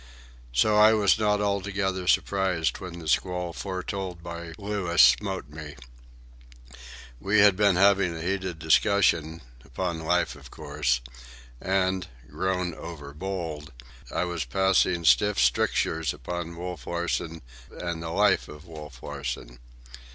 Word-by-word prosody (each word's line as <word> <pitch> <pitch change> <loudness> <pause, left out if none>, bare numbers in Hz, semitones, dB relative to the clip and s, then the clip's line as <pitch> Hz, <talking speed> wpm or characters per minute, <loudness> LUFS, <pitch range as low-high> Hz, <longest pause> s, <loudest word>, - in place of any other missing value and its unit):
So 85 - +3
I 110 +1 +7
was 105 -1 +3
not 105 -1 +2
altogether 100 -2 -1
surprised 95 -5 +1
when 90 -2 -8
the 80 -2 -9
squall 90 +1 0
foretold 95 -2 -5
by 85 -1 -7
Louis 100 -4 -2
smote 95 -7 +4
me. 75 -1 -9 1.4
We 100 +6 +1
had 100 -2 +6
been 100 -1 +3
having 95 -2 +4
a - - -6
heated 95 -2 -2
discussion,—upon 80 - 0
life, 90 +2 0
of - - -13
course,—and, 60 +7 -3 0.2
grown 90 +2 -1
over 75 -3 -9
bold, 80 -3 -5 0.4
I - - 0
was 85 -3 -3
passing 90 +4 +2
stiff 105 +4 +4
strictures 70 +4 +1
upon 85 -1 -5
Wolf 90 -7 -6
Larsen 85 -2 -3 0.3
and 85 -2 -5
the 85 - -5
life 100 +3 +2
of 75 +2 -12
Wolf 75 -6 -11
Larsen. 60 -4 -6
85 Hz, 120 wpm, -26 LUFS, 75-95 Hz, 1.4 s, I